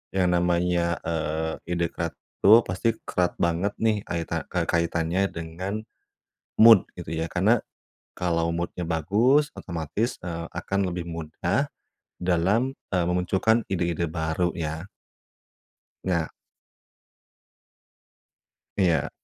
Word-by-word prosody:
yang 90 -2 +3
namanya, 85 -1 +2
eee, 80 0 -1 0.2
ide, 85 -1 0
kerat 85 -1 -4 0.3
itu 110 +4 +9
pasti 110 +5 0
kerat 90 -1 0
banget 85 +4 +1
nih, 110 -2 +1
kaitan 85 -1 -2
ka - - -2
kaitannya 85 +2 0
dengan 85 +4 -5 0.8
mood, 110 -3 +8
gitu 85 -2 -6
ya. 80 0 -2
Karena, 105 +7 +3 0.5
kalau 85 -1 0
mood-nya 85 0 -3
bagus, 110 - +3
otomatis, 85 - -2
eee, 85 -1 -4
akan 100 +3 -1
lebih 85 -1 -5
mudah 85 - -1 0.6
dalam, 95 +10 +1 0.2
eee, 90 -2 +2
memunculkan 95 +6 +2
ide-ide 85 -3 -1
baru, 80 +2 -1
ya. 80 +1 -4 1.2
Nah 85 -4 0 2.5
Iya. 85 -7 +2
85 Hz, 105 wpm, -26 LUFS, 85-95 Hz, 2.5 s, itu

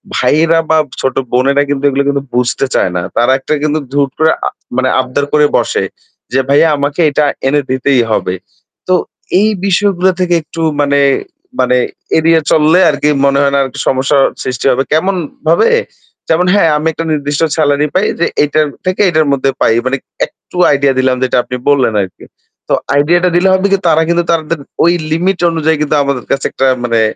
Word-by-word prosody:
ভাইয়েরা 165 +2 +2
বা 160 - +4 0.2
ছোট 130 -1 -1 0.2
বোনেরা 140 +3 +2
কিন্তু 140 -1 -2
এগুলো 140 +1 0
কিন্তু 140 -1 -1
বুঝতে 125 +2 0
চায় 90 - +1
না। 90 - -1 0.2
তারা 120 +2 +3
একটা 155 - -3
কিন্তু 155 +1 0
হুট 140 -1 +1
করে 160 0 +4 0.2
আ - - -1 0.3
মানে 130 0 +1
আবদার 130 +2 -1
করে 150 0 +4
বসে। - - -1 0.5
যে 130 - +2
ভাইয়া 145 +4 +4
আমাকে 145 +3 -2
এটা 145 +1 +1 0.2
এনে 145 +2 +2
দিতেই 130 -1 +2
হবে। 95 -3 -1 0.5
তো 185 - +2 0.5
এই 215 +2 +3 0.2
বিষয়গুলো 190 -1 +1
থেকে 180 -1 0
একটু 165 +2 -8 0.2
মানে, 140 0 +1 0.6
মানে, 125 0 +2 0.4
এড়িয়ে 165 0 +3
চললে 155 +4 +4
আরকি 150 - 0 0.2
মনে 140 0 +2
হয় 140 -1 +2
না 140 - +3
আর 135 - -3 0.2
সমস্যা 135 +2 +1 0.3
সৃষ্টি 125 0 -4
হবে। 130 +2 +1
কেমনভাবে? 165 - 0 0.6
যেমন 170 +2 +2
হ্যাঁ, 200 -5 +3
আমি 155 +2 -2
একটা 165 +1 -5
নির্দিষ্ট 145 -1 -2 0.2
সেলারি 145 -1 +1
পাই 190 - +2
যে 170 - +2 0.2
এটা 150 +1 +1 0.2
থেকে 185 +2 0
এটার 155 -2 +1
মধ্যে 135 0 0
পাই। 110 - +3
মানে 135 +1 0 0.3
একটু - - -20 0.2
আইডিয়া 140 -1 +2
দিলাম 130 0 +2
যেটা 125 - 0
আপনি 125 - -6
বললেন 135 -6 +2
আরকি। 95 -1 -7 0.4
তো - - 0 0.2
আইডিয়াটা 175 +5 +2
টা - - -6
দিলে 185 +2 +3
হবে 190 +1 +2
কি 195 - +4
তার 160 -1 +3
কিন্তু 170 0 +1
তাদের 165 -1 -1 0.2
ওই 170 +2 +4 0.2
লিমিট 180 +4 0
অনুযায়ী 160 -1 0
কিন্তু 150 0 0
আমাদের 140 -3 -3
কাছে 135 - -1
একটা 135 - 0 0.2
মানে 115 -1 +1
145 Hz, 185 wpm, -12 LUFS, 135-165 Hz, 0.6 s, বা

